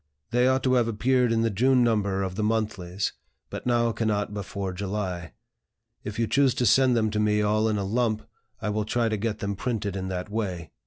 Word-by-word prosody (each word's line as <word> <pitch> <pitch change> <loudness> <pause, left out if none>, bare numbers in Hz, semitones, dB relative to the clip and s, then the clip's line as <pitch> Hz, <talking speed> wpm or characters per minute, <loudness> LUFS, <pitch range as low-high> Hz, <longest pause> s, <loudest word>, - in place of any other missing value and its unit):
They 125 +1 +3
ought 130 +1 +2
to 130 - +2
have 120 -2 +3
appeared 125 +2 +2
in 115 0 +2
the 115 - +1
June 125 +5 +3
number 100 -4 +1
of 95 -1 -3
the 105 - -3
monthlies, 105 -4 -1 0.4
but - - -6
now 120 -1 +2
cannot 105 -2 -1
before 100 -1 -4
July. 95 -4 -4 0.7
If 105 0 -6
you 115 - +2
choose 135 +1 +3
to 125 - +1
send 125 +2 +4
them 110 -1 +1
to 105 - -1
me 105 0 +2
all 110 +1 +2
in 105 - 0
a 100 - -2
lump, 110 0 0 0.3
I - - -2
will 105 +1 0
try 115 +2 0
to 110 - 0
get 110 +1 -2
them 100 -1 -3
printed 105 -3 -2
in 95 -1 -3
that 95 +2 -4
way. 90 -8 -3
105 Hz, 215 wpm, -26 LUFS, 100-115 Hz, 0.7 s, send